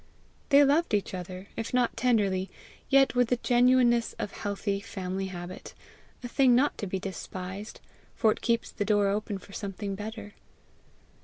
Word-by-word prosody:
They 285 +1 +7
loved 285 -3 +3
each 200 - -2
other, 185 +1 -6
if 225 +2 -3
not 250 -1 +2
tenderly, 205 -6 +1 0.4
yet 270 0 +5
with 245 -1 +3
the 250 - +2
genuineness 245 -1 +3
of 205 - -5
healthy 200 0 -3
family 190 -2 -4
habit 175 -1 -8 0.5
a - - -3
thing 255 0 +4
not 280 +4 +3
to 205 - -3
be 190 - -2
despised, 190 +2 -6 0.4
for 220 - +3
it - - -4
keeps 235 -1 0
the - - -2
door 205 -1 +2
open 205 0 -2
for 195 +1 -15
something 200 0 -4
better. 210 +1 -7
210 Hz, 160 wpm, -28 LUFS, 195-245 Hz, 0.5 s, They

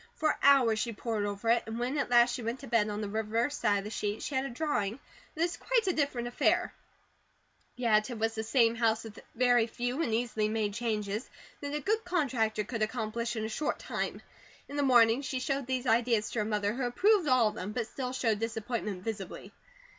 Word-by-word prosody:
For 310 -1 +1
hours 255 -6 +5
she 235 0 -2
pored 215 -1 -2
over 205 +2 -5
it, 235 0 +4
and 225 +1 -4
when 245 +4 -1
at - - -1
last 240 0 +5
she 245 - -4
went 230 +3 -3
to 275 - -9
bed, 225 -2 +2
on 210 +1 -3
the 210 - -3
reverse 220 +6 -1
of 205 -3 +2
the 210 - -6
sheet 210 0 -3
she - - -4
had 265 0 0
a - - -3
drawing 235 -5 -1 0.4
that 315 - -4
was 345 - -1
quite 480 -3 +1
a 370 - +2
different 280 -6 -1
affair; 240 - +1 1.0
yet 215 -3 +2
it 240 - -5
was 225 +1 0
the 220 - -3
same 230 0 +3
house 225 -1 +1
with 220 -1 -10 0.2
very 245 -1 +4
few 245 +5 -2
and 245 - 0
easily 220 -2 0
made 215 -2 -1
changes 215 -1 -2 0.3
that 285 0 -4
a - - 0
good 435 +7 0
contractor 255 -12 0
could 225 +2 -5
accomplish 230 +1 -2
in 220 -1 -2
a - - -1
short 260 +7 -2
time. - - -4 0.4
In 285 - -8
the 290 - +1
morning, 240 -2 +5
she 265 -2 -3
showed 275 0 -2
these 260 -1 -1
ideas 230 -2 +2
to 230 - -2
her 210 - 0
mother 210 -1 0
who 250 +1 -2
approved 385 - +3
all 255 -5 +4
of - - -9
them, 195 +3 -5
but 235 +1 -2
still 250 +2 -5
showed 230 -5 0
disappointment 225 -3 -3
visibly. 200 -4 -6
235 Hz, 220 wpm, -30 LUFS, 215-260 Hz, 1.0 s, hours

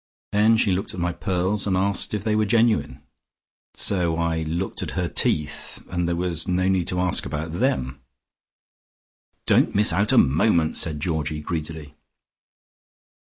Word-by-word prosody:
Then 110 +2 +4
she 105 -3 +2
looked 95 +2 -2
at - - -6
my 85 0 -1
pearls, 95 +2 -1
and 95 -2 +1
asked 100 +2 -1
if 105 - -4
they 110 -1 0
were 110 0 +1
genuine. 115 0 +1 0.7
So 90 -4 +1
I 85 -1 -1
looked 85 +4 -3
at - - -5
her - - 0
teeth, 75 -1 -1
and 90 -1 -1
there 85 - 0
was 85 -2 -2
no 90 +1 +1
need 95 -3 +1
to 90 - -2
ask 90 -1 +1
about 80 +2 -5
them." 70 - -1 1.5
"Don't - - +3
miss 105 +1 +4
out 100 +2 +1
a - - +3
moment," 80 +3 +3
said 80 -4 +1
Georgie 80 -2 -2
greedily. 80 -2 -6
90 Hz, 160 wpm, -23 LUFS, 80-100 Hz, 1.5 s, Then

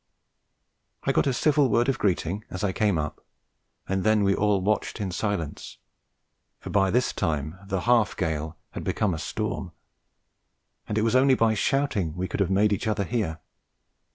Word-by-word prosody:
I - - +2
got - - +2
a - - +3
civil 145 +1 +3
word 120 +3 +2
of 135 - 0
greeting 95 +1 0
as 95 - -5
I 100 - +1
came 100 -2 +1
up, 75 -1 -4 0.6
and 95 -1 -1
then 110 -1 +3
we 100 0 +3
all 105 0 +2
watched 105 +4 -1
in 100 -3 -2
silence, 95 -5 -3 0.8
for - - -8
by 95 -1 +3
this 125 +5 +1
time 75 -1 -2
the 95 -2 -1
"half 115 -1 +2
gale" 80 -3 -2
had - - -6
become 105 -4 0
a 80 - -4
storm, - - -4 1.2
and 105 - -1
it 110 - +2
was 115 +2 +2
only 130 +1 +5
by 115 -2 +3
shouting 110 - 0
we 90 +1 -2
could 90 - -4
have 100 -3 +2
made 105 +2 +3
each 100 - -2
other 105 -2 0
hear. 95 -7 -2
100 Hz, 180 wpm, -26 LUFS, 90-110 Hz, 1.2 s, only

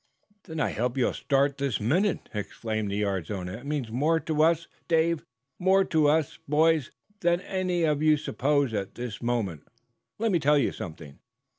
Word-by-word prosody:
"Then 160 -3 -6
I - - +1
hope 125 +3 -2
you'll 130 - +2
start, 140 0 +1
this 140 -5 0
minute," 175 - +1
exclaimed 110 0 -3
the 100 - -2
yard's 100 -5 -1
owner. 95 0 -4
"It 135 - -11
means 140 -6 -2
more 155 +7 +2
to 155 0 0
us, 165 +1 +3 0.2
Dave 165 -1 +2 0.4
more 190 +1 +4
to 155 -3 +3
us, 155 -1 +1
boys 155 -1 +3 0.3
than 175 -1 +2
any 185 -3 -1
of 150 -2 +1
you 155 -1 +5
suppose 140 -1 0
at 100 -2 -3
this 120 -4 -6
moment! 110 -11 -2 0.5
Let 225 0 +1
me 175 - +3
tell 150 0 +4
you 140 - +2
something. 80 -4 -9
145 Hz, 175 wpm, -27 LUFS, 110-160 Hz, 0.5 s, you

